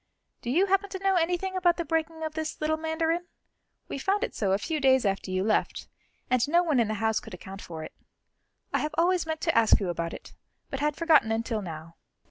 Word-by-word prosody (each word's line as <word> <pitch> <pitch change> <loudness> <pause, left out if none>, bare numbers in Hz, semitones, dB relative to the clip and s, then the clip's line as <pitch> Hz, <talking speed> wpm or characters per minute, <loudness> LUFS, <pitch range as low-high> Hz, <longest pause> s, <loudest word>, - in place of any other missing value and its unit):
Do 240 - -5
you 345 +10 +4
happen 390 +1 +1
to 380 - -4
know 390 0 +3
anything 360 +2 0
about 355 -2 +3
the 340 - -2
breaking 320 +1 -1
of 315 -1 -3
this 315 0 -4
little 310 +1 +1
mandarin? 320 +2 -1 0.6
We - - -5
found 400 - +1
it - - -3
so 200 -3 0
a 195 - +3
few 310 +8 -2
days 265 -3 +4
after 195 -1 -1
you 185 0 0
left, 215 +1 0 0.4
and 255 +2 +2
no 345 +3 +4
one 305 -7 +2
in 230 - +3
the 215 - -2
house 220 0 +1
could 190 - -10
account 190 +2 -9
for 160 -2 -7
it. - - -9 0.8
I - - +2
have 305 0 -3
always 345 0 +2
meant 315 -1 -3
to 330 - +1
ask 225 -1 +5
you 195 -4 -2
about 170 -1 -3
it, - - -12 0.4
but 270 - -3
had 295 0 0
forgotten 315 -9 +4
until 225 0 -1
now." 165 -2 -8
305 Hz, 230 wpm, -27 LUFS, 215-335 Hz, 0.8 s, ask